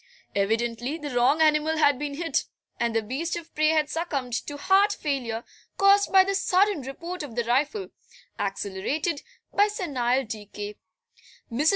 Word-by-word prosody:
Evidently 230 +7 0
the 295 -3 -6
wrong 265 +6 +4
animal 310 +1 +3
had 285 -4 +4
been 290 -1 -3
hit, 330 +2 -1 0.3
and 235 -1 0
the 225 - +2
beast 275 +10 -3
of 335 -1 -8
prey 310 0 +2
had 310 -1 +3
succumbed 290 -6 -3
to 290 +4 -3
heart 390 +6 +4
failure, 250 - -2 0.3
caused 395 +1 +5
by 380 -1 +8
the 395 +1 -1
sudden 390 -2 +2
report 335 +7 -6
of 275 -7 -7
the 240 - +1
rifle, 290 - 0 0.5
accelerated 205 - -2 0.3
by 410 +1 +5
senile 270 - 0
decay. 210 -1 -7 0.8
Mrs. 285 +7 +3
290 Hz, 155 wpm, -26 LUFS, 240-335 Hz, 0.8 s, by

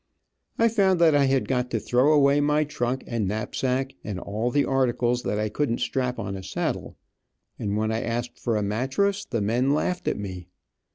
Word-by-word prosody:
I 230 - +4
found 195 -5 +3
that 165 -2 +5
I 145 -1 +4
had 135 -1 +1
got 125 -1 0
to - - -1
throw 125 +5 +3
away 145 -1 +4
my 150 +1 +2
trunk 130 -3 -2
and 115 -4 -2
knapsack, 125 +6 -1
and 100 -4 -4
all 110 +6 -2
the 145 +3 +2
articles 125 -2 +1
that 105 - -2
I 110 0 0
couldn't 120 +1 -1
strap 125 -1 -1
on 100 -3 -4
a 95 - -6
saddle, 95 +1 -3 0.6
and 105 0 -1
when 110 +1 0
I 110 - -1
asked 120 +1 -3
for 115 -3 0
a 105 - 0
mattress 135 - 0
the 115 -3 -2
men 125 +7 +2
laughed 180 +3 -2
at - - 0
me. 95 -3 -6
125 Hz, 195 wpm, -25 LUFS, 110-140 Hz, 0.6 s, that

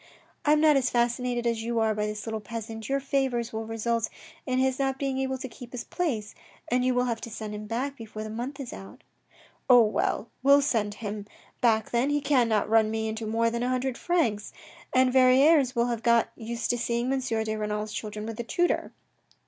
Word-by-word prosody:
" - - -34
I 300 - +5
am 305 - +3
not 305 -2 +6
as 255 -2 +1
fascinated 240 0 0
as 230 -1 0
you 230 +1 -2
are 220 -1 +2
by 210 0 -1
this 210 0 -5
little 220 -1 -3
peasant. 225 0 -7
Your 275 0 +1
favours 265 -4 -1
will 220 0 -4
result 225 0 -1 0.4
in 255 -1 0
his 260 0 +1
not 270 -1 0
being 270 -1 -2
able 265 0 -1
to 260 - -6
keep 245 0 -12
his 245 - -4
place, 245 - -2 0.4
and 250 +1 +2
you 255 0 +2
will 250 - +3
have 235 -2 -2
to 230 - -6
send 215 -1 -6
him 210 0 -6
back 265 +5 -3
before 215 -1 -7
the 215 - -6
month 250 +6 -5
is 265 -4 -6
out." 195 - -11 0.3
" - - -29
Oh, 245 -2 +8
well! 215 +1 -1
we'll 280 +2 +6
send 215 -7 0
him 210 -1 -6 0.3
back 220 -3 +2
then, 245 +4 +2
he 290 0 +2
cannot 240 -7 +2
run 220 0 +4
me 220 0 -2
into 220 0 -4
more 230 +1 +1
than 235 0 -2
a 245 - 0
hundred 255 0 -1
francs, 240 -14 0 0.4
and 255 0 +3
Verrieres 265 +1 +5
will 235 0 +2
have 235 -2 -2
got 235 -1 +3
used 230 +1 -3
to 240 - -1
seeing 235 +2 0
M. 270 - +1
de 220 -4 -1
Renal's 210 0 -3
children 210 0 -5
with 225 0 -6
a - - -1
tutor. 350 +9 0
235 Hz, 220 wpm, -27 LUFS, 220-260 Hz, 0.4 s, Oh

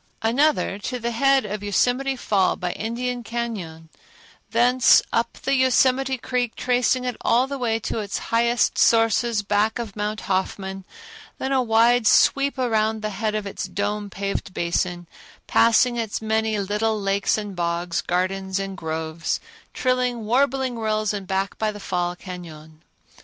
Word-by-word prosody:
Another, 245 -3 +2
to 250 +5 -4
the 235 0 -3
head 270 +1 +3
of 210 0 -4
Yosemite 245 +7 +1
Fall 200 -6 +1
by 180 -1 -3
Indian 240 +3 -3
Cañon; 205 -10 -5 0.6
thence 245 +3 +5
up 230 0 0
the 275 - +1
Yosemite 260 0 +3
Creek, 245 -1 -2
tracing 250 0 +1
it 250 - -2
all 245 +3 +3
the 275 0 -5
way 230 -3 0
to 225 - -3
its 205 -2 -3 0.2
highest 235 +1 +2
sources 225 -1 +3
back 205 +3 +1
of 230 -5 -6
Mount 210 0 -3
Hoffman, 190 0 -3 0.5
then 265 - -3
a 265 -1 +3
wide 230 0 +3
sweep 275 +5 +4
around 220 -3 0
the 215 - -2
head 215 +2 -2
of 215 -1 -2
its 200 - -4
dome 205 0 -3
paved 195 -1 -4
basin, 175 +1 -1 0.4
passing 240 +1 +3
its 225 -3 -2
many 220 0 0
little 210 +2 -1
lakes 195 +1 +1
and 205 -2 -5
bogs, 170 0 -1
gardens 190 +2 -1
and 195 0 -4
groves, 160 -1 -3 0.3
trilling, 250 -3 0
warbling 260 +1 +1
rills, 215 -1 0
and 200 -2 -5
back 195 +1 -2
by 215 -1 0
the 205 - -10
Fall 175 -2 -2
Cañon. 160 -4 -10
220 Hz, 150 wpm, -23 LUFS, 195-245 Hz, 0.6 s, thence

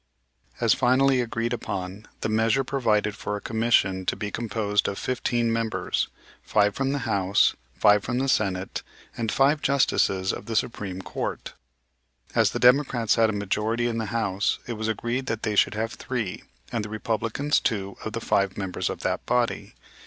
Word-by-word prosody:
As 115 -2 +4
finally 130 +1 +3
agreed 115 0 -2
upon, 100 -2 -5
the - - 0
measure 110 +4 +2
provided 110 -6 +1
for 105 - -4
a - - -6
commission 110 -4 +1
to - - +1
be 105 -1 -4
composed 105 -3 0
of 100 - -3
fifteen 120 -2 0
members, 115 -1 -1 0.3
five 105 -1 +2
from 135 +3 -1
the 145 - 0
House, 100 0 +3 0.2
five 105 0 +5
from 120 0 -2
the 135 +1 0
Senate, 95 -6 0 0.3
and 115 -2 -2
five 140 +2 +3
Justices 95 -8 +2
of - - -7
the 115 - -3
Supreme 95 -5 -2
Court. - - -4 0.8
As - - +4
the - - -3
Democrats 125 -3 +4
had 115 -1 +4
a - - -1
majority 105 +4 -1
in 115 -1 -1
the 110 - -2
House, 100 -3 0
it 120 - -4
was 110 0 -3
agreed 120 +4 -2
that 115 -2 -2
they 105 -1 0
should 100 - +3
have 110 +1 -2
three, 115 -8 -4 0.3
and 115 -3 -1
the 105 - -6
Republicans 115 +6 0
two 100 -4 -2
of - - -5
the - - -3
five 100 -1 +1
members 95 -3 -2
of - - -5
that - - -1
body. 120 -1 0
110 Hz, 175 wpm, -25 LUFS, 105-120 Hz, 0.8 s, five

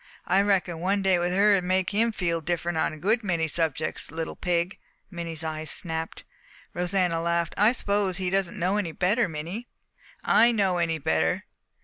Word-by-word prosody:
I 190 +2 +3
reckon 190 -4 +1
one 195 +3 0
day 190 -2 +3
with 175 +1 0
her 200 +3 +4
would 190 -2 +2
make 185 +1 +1
him 225 +3 +2
feel 170 -5 -1
different 175 +1 -2
on - - +1
a 155 - -9
good 215 +8 +1
many 170 -5 0
subjects. 160 -1 -1
Little 160 +1 -5
pig!" 175 0 -1 0.3
Minnie's 170 -2 -5
eyes 155 -1 -4
snapped. 160 -2 -4 0.5
Rosanna 180 -2 0
laughed. 170 -1 0
"I 210 +3 +5
suppose 200 -6 0
he 185 -2 -2
doesn't 195 -2 0
know 185 +3 +1
any 175 -6 -2
better, 195 +5 +1
Minnie." 170 +10 -6 0.6
"Know 205 -6 +4
any 165 -1 0
better? 80 - 0
180 Hz, 170 wpm, -26 LUFS, 165-195 Hz, 0.6 s, I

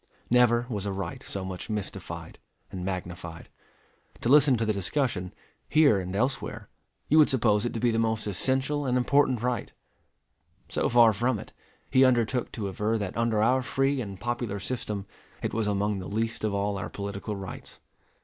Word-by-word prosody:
Never 120 -1 +4
was 105 -5 -3
a - - -1
right 95 -3 -4
so 95 -1 -5
much 95 +3 -6
mystified 105 -2 -5 0.3
and 90 -1 -5
magnified. 90 -2 -5 0.7
To 115 - 0
listen 140 -2 +6
to 115 - 0
the 110 - +1
discussion, 100 -2 -1 0.4
here 145 -10 +5
and 95 0 -4
elsewhere, 125 +6 -2 0.4
you 155 - +5
would 150 - +7
suppose 110 -3 +2
it - - -5
to - - -1
be 120 +1 +2
the 115 - +1
most 110 -1 0
essential 130 +7 0
and 125 0 +2
important 130 -1 +2
right: 125 -3 -1 1.0
so - - 0
far 115 -2 +6
from 120 +3 +1
it, - - -10 0.4
he 130 - +6
undertook 125 -1 +2
to 105 -4 -3
aver 105 +4 0
that 100 -3 -4
under 115 -2 +2
our 130 +3 +3
free 135 +1 0
and 100 -4 -7
popular 120 -3 -2
system 105 -2 -3 0.4
it - - -2
was 110 -1 0
among 100 0 0
the 95 - -6
least 115 +2 -2
of 110 - +1
all 100 0 -1
our - - -4
political 100 +1 -5
rights. 95 -2 -8
110 Hz, 180 wpm, -27 LUFS, 100-125 Hz, 1.0 s, would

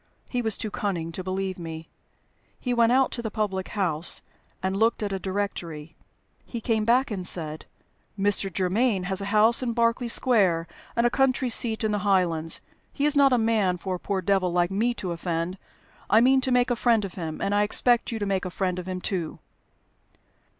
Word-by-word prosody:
He 245 - -2
was 220 -3 0
too 215 - -4
cunning 175 -6 -3
to 185 +3 -6
believe 190 0 -3
me; 165 -1 -7 0.7
he 250 - -2
went 235 -1 +3
out 260 +1 +3
to 240 - -4
the 225 - -3
public 200 -3 -2
house 175 -5 +1 0.4
and 190 0 -1
looked 225 +2 +1
at 200 -1 -2
a 195 - -2
directory. 175 -5 -4 0.5
He 235 - -6
came 220 -1 0
back 245 +2 +2
and 190 -3 -3
said, 160 -3 +1 0.5
'Mr. 200 -1 +1
Germaine 190 +3 +1
has 190 +1 -2
a - - -4
house 215 +4 +4
in 240 -2 -1
Berkeley 235 +1 +1
Square 195 -9 +2 0.3
and 235 - +2
a 240 - +3
country 260 -1 +1
seat 225 -1 0
in 215 - +1
the 210 - 0
Highlands. 175 -5 +1 0.3
He 285 - -1
is 300 0 +1
not 280 -1 +5
a 250 - +4
man 220 -5 +1
for 185 +2 -4
a 180 - -4
poor 190 -1 -3
devil 190 -1 +1
like 175 +1 +1
me 230 +5 0
to 185 -6 -4
offend; 170 +2 -3 0.5
I 220 - +6
mean 260 +3 +4
to 260 - -1
make 250 0 +3
a - - +2
friend 230 -3 +2
of 190 - -8
him, 160 -4 -5
and 200 - -1
I 205 - +3
expect 240 +4 +2
you 230 - -3
to 205 - -2
make 195 -2 -1
a 185 - -3
friend 180 0 -2
of 180 - -8
him 185 0 -4
too.' 180 -6 -3
200 Hz, 205 wpm, -25 LUFS, 180-235 Hz, 0.7 s, I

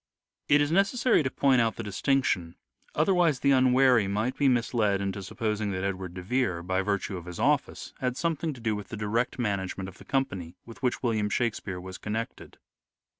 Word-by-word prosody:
It 145 0 +6
is 145 +1 +1
necessary 200 +6 +3
to 130 - -1
point 130 -2 +3
out 115 -1 +1
the 115 - -5
distinction, 100 -4 0 0.4
otherwise 165 -4 +3
the 140 - +4
unwary 130 -4 +4
might 105 +6 -1
be 140 - +2
misled 115 -5 +2
into 100 0 -3
supposing 105 +2 -2
that 95 0 -3
Edward 95 -2 -3
de 90 - -6
Vere, 95 -5 0
by 95 +2 0
virtue 100 -1 -2
of 85 - -9
his 90 -1 -8
office, - - 0
had 125 0 -1
something 165 0 -1
to 130 - -12
do 115 -2 -1
with 105 -2 -6
the 110 - -7
direct 110 +4 -1
management 100 -4 -2
of 95 - -12
the - - -13
company 95 -11 -2
with 115 +2 -12
which 125 -1 -1
William 110 -4 +1
Shakspere 105 -4 -2
was 95 +1 -8
connected. 110 +2 -5
110 Hz, 190 wpm, -28 LUFS, 95-130 Hz, 0.4 s, It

